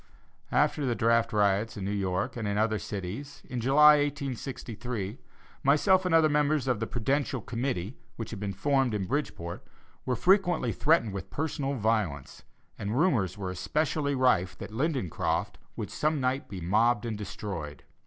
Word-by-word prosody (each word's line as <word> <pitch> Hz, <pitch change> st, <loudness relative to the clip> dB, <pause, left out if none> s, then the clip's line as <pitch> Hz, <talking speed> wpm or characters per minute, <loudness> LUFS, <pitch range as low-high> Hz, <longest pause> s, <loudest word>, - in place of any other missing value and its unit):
After 150 Hz, -, +2 dB
the 125 Hz, -3 st, 0 dB
draft 115 Hz, 0 st, +2 dB
riots 105 Hz, +1 st, +1 dB
in 95 Hz, -, -4 dB
New 100 Hz, -, -1 dB
York 95 Hz, -2 st, -1 dB
and 115 Hz, -3 st, -3 dB
in 100 Hz, 0 st, -1 dB
other 110 Hz, 0 st, +1 dB
cities, 105 Hz, +9 st, -6 dB
in 125 Hz, -1 st, -4 dB
July, 150 Hz, +4 st, +7 dB
1863, 125 Hz, -6 st, -4 dB, 0.4 s
myself 185 Hz, +7 st, +4 dB
and 165 Hz, -, +3 dB
other 160 Hz, -1 st, +6 dB
members 150 Hz, -2 st, +1 dB
of 125 Hz, -5 st, +1 dB
the 115 Hz, -, -2 dB
"Prudential 135 Hz, +3 st, -1 dB
Committee" 115 Hz, -2 st, -3 dB, 0.2 s
which 115 Hz, -, -6 dB
had 110 Hz, -, -6 dB
been 100 Hz, 0 st, -3 dB
formed 135 Hz, +3 st, +1 dB
in 100 Hz, -2 st, -1 dB
Bridgeport 90 Hz, -, -3 dB, 0.4 s
were 125 Hz, -, 0 dB
frequently 175 Hz, -, +3 dB
threatened 140 Hz, -6 st, +2 dB
with 95 Hz, -3 st, -6 dB
personal 140 Hz, -2 st, -2 dB
violence, 105 Hz, -, -1 dB, 0.4 s
and 105 Hz, +4 st, -2 dB
rumors 130 Hz, -, +2 dB
were 95 Hz, -2 st, -4 dB
especially 145 Hz, -, -1 dB
rife 95 Hz, -9 st, +2 dB
that -, -, -8 dB
Lindencroft 130 Hz, -, -1 dB, 0.2 s
would -, -, -5 dB
some 155 Hz, 0 st, 0 dB
night 130 Hz, +2 st, -1 dB
be 95 Hz, -3 st, -6 dB
mobbed 110 Hz, +6 st, +2 dB
and 115 Hz, -2 st, -2 dB
destroyed. 95 Hz, -7 st, -6 dB
120 Hz, 160 wpm, -28 LUFS, 100-140 Hz, 0.4 s, July